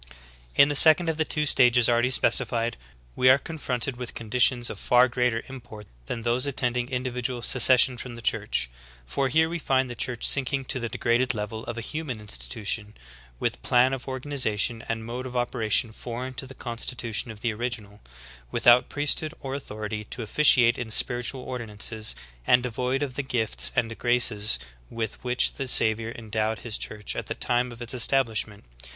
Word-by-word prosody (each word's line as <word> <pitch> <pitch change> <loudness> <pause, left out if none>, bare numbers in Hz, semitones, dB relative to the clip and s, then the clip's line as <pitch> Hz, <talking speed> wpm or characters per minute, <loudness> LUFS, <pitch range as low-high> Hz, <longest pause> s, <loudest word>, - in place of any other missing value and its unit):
18. - - +8
In 140 - +2
the 145 - -1
second 160 +3 +6
of 160 - -2
the 160 - +1
two 150 0 -1
stages 125 -4 +5
already 120 +1 +2
specified, 120 -2 +2 0.4
we 130 - +4
are 130 - +7
confronted 135 -4 -4
with 125 -1 -7
conditions 120 +2 +2
of - - -9
far 125 +1 +4
greater 125 -2 -1
import 120 -5 -11 0.2
than 115 - -5
those 120 +3 0
attending 125 -2 -1
individual 125 -1 -3
secession 125 0 +5
from 120 0 -8
the 115 - -10
Church; - - 0 0.4
for 135 - -1
here 160 +5 +3
we 170 +1 -4
find 130 -3 0
the - - -4
Church 120 0 -2
.sinking 135 0 +2
to 130 - -3
4:i^ 115 -1 -5
d^grad€4 125 +2 +1
level 110 +1 -5
cl 120 - -6
a - - -3
human 145 -2 -5
institution, 105 - -4 0.4
with - - -2
plan 125 +2 +3
of 130 - -6
organization 125 -4 -1
and 115 -1 -3
mode 125 +3 -5
of 125 0 -5
operation 120 -1 +1
foreign 125 +3 -6
to 130 - -3
the 135 - -12
constitution 120 -1 -3
of 110 -1 -10
the 115 -2 -1
original, 110 -3 -5 0.5
with - - -4
out 120 +1 +6
priesthood 150 +2 -1
or 135 -1 -6
authority 110 -5 -5
to 120 - -5
officiate 120 0 +4
in 120 -2 -5
spiritual 125 +3 +1
ordi 125 -3 -5
nances, 110 +1 -3 0.3
and 125 0 +5
devoid 125 +3 -2
of 135 -3 -4
the 140 - -2
gifts 120 -5 +1
and 115 -3 0
graces 120 - +2 0.3
with 115 -2 -5
which 125 0 +2
the 135 - -5
Savior 110 -2 +2
endowed 110 -1 -2
His 115 -3 -3
Church 105 -1 -4
at - - -5
the - - -4
time 125 0 +1
of 120 0 -8
its 120 - -2
establishment. 115 -5 0
120 Hz, 180 wpm, -25 LUFS, 115-130 Hz, 0.5 s, 18